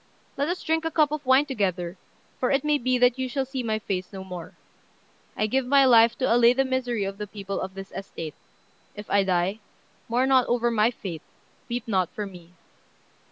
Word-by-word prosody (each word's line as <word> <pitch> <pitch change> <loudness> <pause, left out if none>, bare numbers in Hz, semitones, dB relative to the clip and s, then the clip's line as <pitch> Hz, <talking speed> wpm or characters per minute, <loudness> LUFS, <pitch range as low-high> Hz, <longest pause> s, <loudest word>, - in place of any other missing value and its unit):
Let 280 +1 -1
us 355 +2 -3
drink 320 0 0
a 325 - 0
cup 305 -2 +2
of 305 -1 -3
wine 260 +3 +5
together, 190 -9 -2 0.4
for 250 - +1
it 275 -1 +2
may 300 -1 +2
be 255 +1 +1
that 245 +1 +3
you 260 -1 -2
shall 270 +1 -1
see 265 0 -4
my 220 -2 -1
face 185 -4 -4
no 190 -2 -7
more. 180 -3 -8 0.8
I 215 - +1
give 260 +5 +1
my 275 +2 +5
life 235 -2 +6
to 255 -3 +2
allay 240 0 +6
the 270 +1 +1
misery 250 -4 -1
of 195 +1 -5
the 210 - -4
people 200 -1 -5
of 190 0 -6
this 195 0 -8
estate. 165 -5 -6 0.6
If 210 0 -8
I 200 -1 +4
die, 185 +2 0 0.5
mourn 250 +3 +2
not 260 -2 +4
over 240 0 +1
my 220 0 +3
fate; 185 -9 -7 0.5
weep 240 0 -3
not 190 -5 +1
for 210 - -3
me." 180 -3 -12
235 Hz, 205 wpm, -25 LUFS, 195-260 Hz, 0.8 s, life